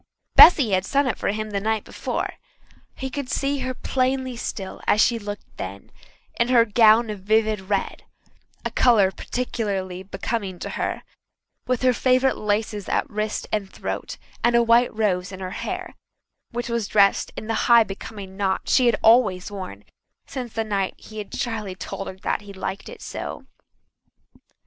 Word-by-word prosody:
Bessy 280 - +9
had 185 -1 +2
sung 280 +8 +1
it 255 - -1
for - - -2
him 215 +1 -2
the 200 - -1
night 220 +1 -1
before. - - -3 0.6
He 265 0 -5
could 280 -2 -4
see 280 0 0
her 255 0 -3
plainly 260 0 -1
still 195 -4 -5
as 210 - +4
she 235 - +5
had 230 - -4
looked 205 0 -8
then, 95 +2 -7 0.5
in 235 - +3
her 240 -2 +5
gown 220 +1 +5
of 210 - -6
vivid 215 +1 +1
red 200 -2 -1 0.6
a - - -1
colour 215 -6 +4
peculiarly 195 -6 -3
becoming 195 0 -4
to - - -6
her - - -3 0.6
with 255 -1 0
her 255 -1 +5
favourite 255 +2 +3
laces 210 -1 -2
at - - +1
wrist 215 0 -2
and 200 -2 -2
throat - - -5 0.3
and 240 0 +4
a 235 - +5
white 235 +1 +4
rose 195 -4 0
in 190 - -8
her 185 -1 -5
hair, - - -5 0.6
which 240 0 -4
was 235 -3 -1
dressed 200 -1 +3
in - - -5
the 225 - -2 0.2
high, 235 -1 +8
becoming 195 -1 -8
knot 190 -1 0
she 255 -2 +4
had 235 - +4
always 215 -5 +4
worn 185 - -7 0.4
since 250 -4 -6
the 225 - -1
night 200 -3 -1
he 215 0 -10
had 205 - -7
shyly 220 -6 -3
told 195 - -6
her 190 - -7 0.2
he 205 -1 -11
liked 190 0 -5
it - - -11
so. - - -6
215 Hz, 175 wpm, -23 LUFS, 195-240 Hz, 0.6 s, Bessy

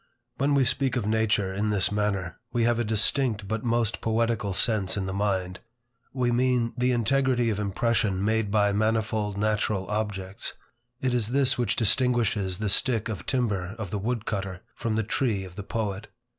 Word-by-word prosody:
When 140 +2 +2
we 140 - +4
speak 130 0 +2
of 120 - -1
nature 110 -3 +1
in 105 +2 -1
this 100 -2 +2
manner, 105 -4 -1
we 120 - +1
have 120 0 +2
a - - +2
distinct 110 0 +1
but 110 +1 -2
most 115 -2 0
poetical 115 -2 0
sense 100 -1 +2
in 95 - -1
the 95 - -3
mind. 95 -2 -1 0.5
We 125 -2 0
mean 120 -1 +1
the 125 +1 +1
integrity 125 0 +2
of 105 - -2
impression 100 -1 0
made 110 -1 +1
by 105 -1 +3
manifold 110 -1 0
natural 105 -2 0
objects. 105 -2 -3 0.5
It 130 -1 0
is 120 -4 0
this 135 +2 +2
which 120 -2 0
distinguishes 115 -5 +1
the 105 +1 -2
stick 115 +2 +1
of 100 -7 -6
timber 105 -7 -1
of 110 -5 -6
the 105 - -2
wood 115 +2 -2
cutter, 95 -3 -4
from 115 -2 -2
the 110 - +1
tree 110 -3 0
of 95 -2 -10
the 105 - -5
poet. 105 -1 -3
110 Hz, 180 wpm, -26 LUFS, 100-120 Hz, 0.5 s, we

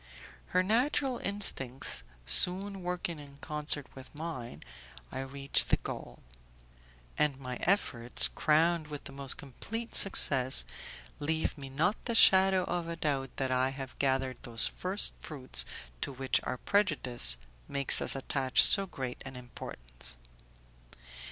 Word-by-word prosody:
Her 185 0 +1
natural 250 +5 0
instincts 135 - -1 0.2
soon 190 - +3
working 175 -2 -4
in 140 -1 -14
concert 150 -1 -3
with 130 +2 -14
mine, 140 - -7 0.5
I - - -6
reach 135 +1 -1
the - - +1
goal; - - -9 1.0
and 150 -3 +1
my 125 -2 -6
efforts, 125 -11 +1
crowned 160 +1 +1
with 150 -2 -8
the - - -9
most 135 -1 -4
complete 225 - -8
success, 130 -9 +5 0.5
leave 160 +2 -1
me 140 -3 -9
not 160 +10 -1
the 235 - -2
shadow 190 -3 +5
of 175 -1 -4
a 170 - -5
doubt 140 -5 -2
that 130 -1 -2
I 130 +1 +1
have 135 -1 -8
gathered 130 -1 -1
those 115 -1 +5
first 190 +3 -3
fruits 130 - 0 0.4
to - - -3
which 135 0 -1
our 130 - -4
prejudice 130 - +2 0.3
makes 140 -1 +6
us - - +3
attach 135 -1 +2
so 195 0 +7
great 130 -7 -7
an 135 0 -10
importance. - - -9
140 Hz, 135 wpm, -30 LUFS, 130-180 Hz, 1.0 s, so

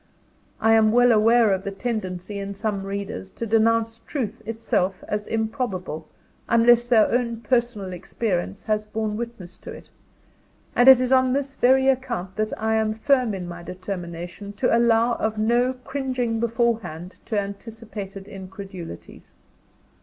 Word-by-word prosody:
I 225 0 +4
am 220 -1 +5
well 245 +1 +5
aware 225 -1 +5
of 190 0 -2
the 200 - -3
tendency, 200 -3 -4
in 200 0 -5
some 200 -1 -2
readers, 195 - -5
to 230 - -3
denounce 225 +1 +2
truth 230 -4 -4
itself 215 -4 -1
as 210 0 -3
improbable, 220 - -3 0.4
unless 235 +1 +5
their 230 -3 +4
own 235 -2 0
personal 230 -5 0
experience 190 +1 -3
has 215 -1 0
borne 215 0 -3
witness 220 -6 -7
to - - -10
it; - - -12 0.8
and 245 +2 +7
it 260 -2 +9
is 255 0 0
on 260 -1 +4
this 275 0 -1
very 265 +1 +4
account 245 -8 -1
that 215 0 0
I 220 0 +1
am 215 0 0
firm 250 -2 +2
in 180 -2 -5
my 175 0 -7
determination 180 +1 -7
to 240 +3 +2
allow 235 0 +3
of 220 0 -1
no 240 +4 +2
cringing 255 -4 -2
beforehand 225 -7 -1
to 215 - 0
anticipated 200 -1 -7
incredulities. 190 - -10
220 Hz, 145 wpm, -24 LUFS, 195-235 Hz, 0.8 s, it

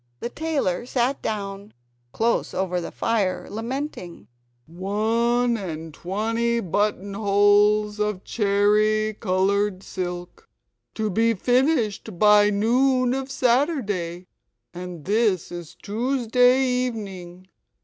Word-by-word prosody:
The 235 - -4
tailor 275 - -2
sat 255 +2 0
down, 200 -1 -5 0.4
close 230 +1 0
over 180 -2 -1
the - - -6
fire, 205 -5 -1
lamenting: 230 - -5 0.4
"One 225 +7 0
and 165 -5 -6
twenty 225 +7 -1
buttonholes 205 +1 +2
of 210 -3 -1
cherry 215 +1 +2
coloured 195 0 0
silk! 180 - -6 0.5
To 215 -1 -1
be 225 +4 +2
finished 240 - 0
by 210 +1 +6
noon 250 +4 +2
of 270 0 -3
Saturday: 235 - 0 0.5
and 175 -3 -8
this 205 -3 +1
is 175 -2 -8
Tuesday 250 +3 +2
evening. 200 -8 -3
210 Hz, 100 wpm, -23 LUFS, 190-235 Hz, 0.5 s, by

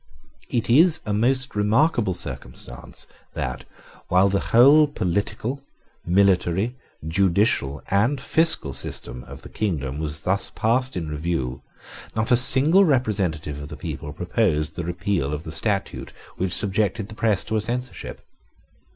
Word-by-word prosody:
It 120 - -1
is 160 +7 +6
a 105 - -2
most 130 +5 +1
remarkable 105 - +2
circumstance - - -6 0.3
that, 60 0 -4 0.4
while 95 +2 +4
the 100 0 +1
whole 140 +6 +6
political, 110 +3 -3 0.4
military, 95 +4 +2 0.3
judicial, 85 - +1
and 120 +8 +2
fiscal 160 - +3
system 60 0 -4
of - - -12
the - - -10
kingdom 75 -9 -3
was 75 -1 -4
thus 95 +3 0
passed 125 0 0
in 80 -3 -4
review, 75 -4 -3 0.5
not 110 +2 -1
a - - +7
single 140 +9 +5
representative 95 - 0
of 70 - -7
the 75 0 -9
people 75 +1 -6
proposed 80 -2 -1
the 85 - -4
repeal 85 -4 -2
of 75 - -8
the 80 - -7
statute 100 +3 -3 0.2
which 95 -1 -2
subjected 100 +3 0
the 110 - -11
press 105 -3 0
to 110 - -3
a 110 - +1
censorship. 125 +3 -6
100 Hz, 140 wpm, -23 LUFS, 80-120 Hz, 0.5 s, a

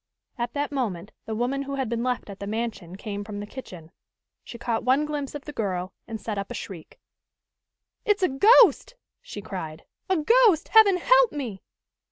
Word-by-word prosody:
At 240 -1 -3
that 290 0 -2
moment 210 -9 -3 0.2
the 220 - -3
woman 250 +5 -1
who 275 0 -4
had 265 -2 -2
been 230 +1 -2
left 250 -4 -2
at 195 - -11
the 200 - -6
mansion 215 -5 -4
came 205 +1 -5
from 205 0 -7
the 205 - -5
kitchen. 180 -9 -10 0.5
She 235 - -9
caught 230 -1 -2
one 265 +4 +3
glimpse 295 -2 -4
of 290 - -7
the 295 - -7
girl 185 -6 -3
and 225 -1 -5
set 210 -1 -4
up 200 - -5
a - - -6
shriek. 175 -5 -9 1.0
"It's 415 -2 +1
a - - +5
ghost!" 450 - +5 0.3
she 205 - -9
cried. 160 -5 -6 0.3
"A 375 - +3
ghost! 420 +1 +4
Heaven 420 -4 +6
help - - +4
me!" 240 -10 -5
240 Hz, 190 wpm, -25 LUFS, 200-295 Hz, 1.0 s, Heaven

